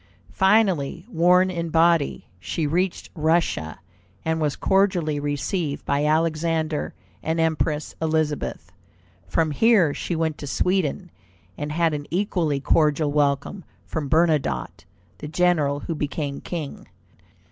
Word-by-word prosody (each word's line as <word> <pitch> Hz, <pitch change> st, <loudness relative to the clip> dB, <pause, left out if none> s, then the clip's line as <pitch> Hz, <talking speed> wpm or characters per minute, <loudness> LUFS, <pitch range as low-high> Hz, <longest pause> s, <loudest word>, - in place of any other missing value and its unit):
Finally, 190 Hz, -6 st, +2 dB
worn 180 Hz, -2 st, +3 dB
in 170 Hz, -2 st, -3 dB
body, 165 Hz, -, +2 dB
she 155 Hz, -, -3 dB
reached 175 Hz, +5 st, -1 dB
Russia, 155 Hz, -, 0 dB, 0.5 s
and 160 Hz, 0 st, 0 dB
was 150 Hz, -2 st, 0 dB
cordially 180 Hz, -6 st, +1 dB
received 145 Hz, +2 st, -2 dB
by 140 Hz, +1 st, +1 dB
Alexander 160 Hz, 0 st, 0 dB, 0.3 s
and 160 Hz, +1 st, -1 dB
Empress 155 Hz, -2 st, 0 dB
Elizabeth. 155 Hz, -2 st, -1 dB, 0.6 s
From 160 Hz, -2 st, +1 dB
here 190 Hz, -3 st, +4 dB
she 170 Hz, -, -3 dB
went 160 Hz, -1 st, -1 dB
to 145 Hz, -, -6 dB
Sweden, 180 Hz, +2 st, 0 dB, 0.4 s
and 150 Hz, +7 st, -4 dB
had 165 Hz, 0 st, +1 dB
an 145 Hz, -1 st, -4 dB
equally 170 Hz, -6 st, 0 dB
cordial 150 Hz, +1 st, +2 dB
welcome 145 Hz, +5 st, 0 dB, 0.2 s
from 150 Hz, -3 st, -4 dB
Bernadotte, 115 Hz, -, +1 dB, 0.3 s
the 150 Hz, -, -6 dB
general 155 Hz, -4 st, +1 dB
who 165 Hz, -, -3 dB
became 145 Hz, -2 st, -3 dB
king. 160 Hz, -5 st, -6 dB
160 Hz, 120 wpm, -23 LUFS, 145-170 Hz, 0.6 s, here